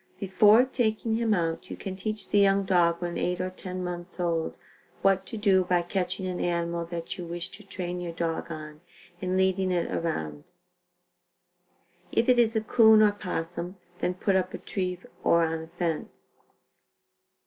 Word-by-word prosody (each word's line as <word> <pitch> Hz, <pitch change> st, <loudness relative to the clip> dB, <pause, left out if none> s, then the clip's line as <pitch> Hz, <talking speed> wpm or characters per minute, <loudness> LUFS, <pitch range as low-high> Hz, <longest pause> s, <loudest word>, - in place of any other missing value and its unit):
"Before 210 Hz, +5 st, +5 dB
taking 225 Hz, -3 st, 0 dB
him 230 Hz, -1 st, +1 dB
out 165 Hz, -2 st, -2 dB
you -, -, -6 dB
can 190 Hz, -1 st, -5 dB
teach 215 Hz, +2 st, -4 dB
the 205 Hz, -, +4 dB
young 195 Hz, 0 st, +4 dB
dog 175 Hz, -2 st, +2 dB
when 175 Hz, -1 st, -3 dB
8 180 Hz, 0 st, -1 dB
or 185 Hz, -, -1 dB
10 185 Hz, 0 st, -6 dB
months 175 Hz, 0 st, -5 dB
old, 165 Hz, -2 st, -1 dB, 0.5 s
what 195 Hz, -1 st, +3 dB
to 225 Hz, -, -6 dB
do 195 Hz, -3 st, +4 dB
by 180 Hz, -1 st, +1 dB
catching 185 Hz, +1 st, -2 dB
an 180 Hz, -1 st, -3 dB
animal 170 Hz, -1 st, -1 dB
that 170 Hz, +1 st, -6 dB
you 175 Hz, -, -4 dB
wish 175 Hz, +2 st, -4 dB
to 210 Hz, -, -11 dB
train 180 Hz, -2 st, -5 dB
your 175 Hz, -1 st, -4 dB
dog 165 Hz, 0 st, -3 dB
on 155 Hz, -1 st, -8 dB, 0.4 s
and 185 Hz, 0 st, 0 dB
leading 190 Hz, 0 st, +2 dB
it 175 Hz, -2 st, 0 dB
around. 80 Hz, -, -3 dB, 1.7 s
If 230 Hz, -, +2 dB
it 250 Hz, -1 st, +5 dB
is 225 Hz, -1 st, +3 dB
a 220 Hz, -, +2 dB
'coon 220 Hz, -1 st, +6 dB
or 210 Hz, -, +6 dB
opossum, 180 Hz, -2 st, -4 dB, 0.2 s
then 180 Hz, -, -1 dB
put 195 Hz, +1 st, +1 dB
up 185 Hz, 0 st, 0 dB
a -, -, -4 dB
tree 180 Hz, -2 st, -3 dB, 0.3 s
or 170 Hz, 0 st, +4 dB
on 160 Hz, 0 st, -2 dB
a 160 Hz, -, -9 dB
fence. 170 Hz, -1 st, -5 dB
180 Hz, 175 wpm, -27 LUFS, 170-195 Hz, 1.7 s, coon